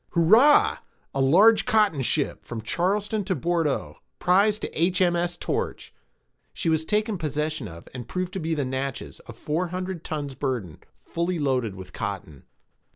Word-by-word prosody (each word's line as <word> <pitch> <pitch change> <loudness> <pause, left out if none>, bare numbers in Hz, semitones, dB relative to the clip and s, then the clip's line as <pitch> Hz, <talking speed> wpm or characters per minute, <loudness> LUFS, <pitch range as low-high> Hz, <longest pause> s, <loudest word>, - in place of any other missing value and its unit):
Hurrah! 220 - +5 0.3
a 135 - 0
large 195 +12 +5
cotton 210 - +3
ship, 140 +3 0
from 115 -2 -7
Charleston 205 - 0
to 185 - 0
Bourdeaux, 165 -1 -1 0.2
prize 200 +4 +3
to - - -5
H.M.S. 175 -1 +1
Torch. - - -3 0.6
She 165 - -1
was 160 0 +2
taken 210 0 0
possession 150 -4 -2
of, 85 -2 -11
and 125 -2 -7
proved 185 +5 -3
to 190 - -3
be 160 -1 -1
the 145 -3 -1
Natches, 130 +1 -4
of - - -9
four 165 +4 -1
hundred 180 -1 -5
tons 145 -3 -4
burden, 125 - -3 0.3
fully 170 +1 -2
loaded 130 -8 0
with 95 -1 -11
cotton. 90 -8 -6
160 Hz, 155 wpm, -25 LUFS, 135-185 Hz, 0.6 s, Hurrah